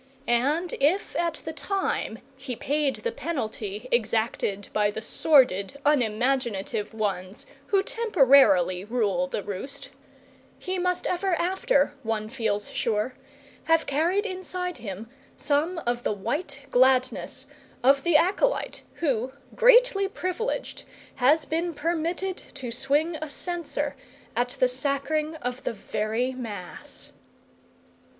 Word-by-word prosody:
And 290 +9 +1
if 315 +9 +1
at 340 -1 -1
the 320 - -4
time 385 - -2 0.2
he 260 -1 -5
paid 285 +2 0
the 470 - -3
penalty 220 - -4
exacted 220 -3 0
by 210 -1 +3
the 210 - -4
sordid 245 -2 +3
unimaginative 235 -5 +1
ones 195 -2 -3 0.2
who 395 -2 +3
temporarily 270 - +4
rule 205 -5 0
the 195 - -3
roast, 260 +9 -6 0.7
he 370 0 -3
must 360 0 0
ever 365 0 +1
after, 360 - +1
one 220 -2 -2
feels 220 -4 -2
sure, 220 +2 0 0.5
have 325 0 +3
carried 340 +9 +1
inside 365 -3 -4
him 215 -2 -7 0.3
some 305 +5 +1
of 240 0 0
the 215 - 0
white 275 - -4
gladness 255 0 +2 0.4
of 275 +2 +5
the 340 -1 +5
acolyte 400 +9 +1
who, 260 -6 0 0.2
greatly 485 -5 +5
privileged, 385 +6 -3 0.3
has 290 +4 +4
been 330 +2 -2
permitted 340 +4 -1 0.2
to 255 -4 -5
swing 285 +7 +2
a 310 0 -5
censer 345 +3 -2 0.4
at 245 +1 +1
the 255 - +5
sacring 280 +4 -1
of 250 +1 -3
the - - -2
very 220 +4 -2
Mass. 215 -8 -7
275 Hz, 120 wpm, -26 LUFS, 225-340 Hz, 0.7 s, of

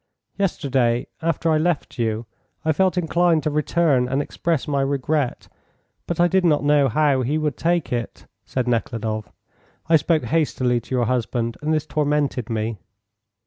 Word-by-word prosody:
"Yesterday, 135 -10 0 0.2
after 165 0 0
I 155 - +3
left 160 -5 -1
you, 115 0 -1 0.4
I 160 - +3
felt 185 +4 +1
inclined 170 -1 +2
to 155 - 0
return 150 -3 +2
and 135 +2 0
express 160 +1 -2
my 140 -2 +1
regret, 140 0 -1 0.6
but 170 - -3
I 175 - +5
did 190 +1 +2
not 150 -5 +3
know 145 -2 +4
how 140 +1 +2
he 140 +5 0
would 150 -3 -1
take 170 -5 0
it," 120 -1 -4 0.2
said 125 -2 -3
Nekhludoff. 115 -2 -2 0.6
"I 160 0 +6
spoke 155 +1 +1
hastily 130 -6 +1
to 130 - -4
your 120 -1 +2
husband, 115 -1 -1
and 150 +1 -1
this 155 -1 +1
tormented 145 -6 0
me." 110 -1 -2
145 Hz, 160 wpm, -22 LUFS, 125-160 Hz, 0.6 s, I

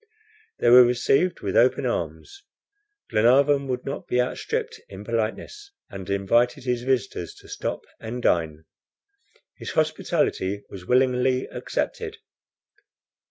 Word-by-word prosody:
They 120 - +3
were 125 +1 +10
received 135 +8 +1
with - - -3
open - - +3
arms. 405 -5 -4 0.7
Glenarvan 140 +5 +4
would 125 -1 -3
not 140 - -5
be 125 - 0
outstripped 450 - -2
in - - -9
politeness, 410 -1 -4 0.2
and 100 -2 -8
invited 100 +6 +1
his 125 -2 -1
visitors 120 -9 -2
to - - -17
stop - - -4 0.2
and 115 +2 -6
dine. 80 -8 0 0.9
His - - -6
hospitality 100 +2 0
was 90 -2 -10
willingly 130 0 +2
accepted. 450 -1 -4
125 Hz, 115 wpm, -24 LUFS, 110-140 Hz, 0.9 s, were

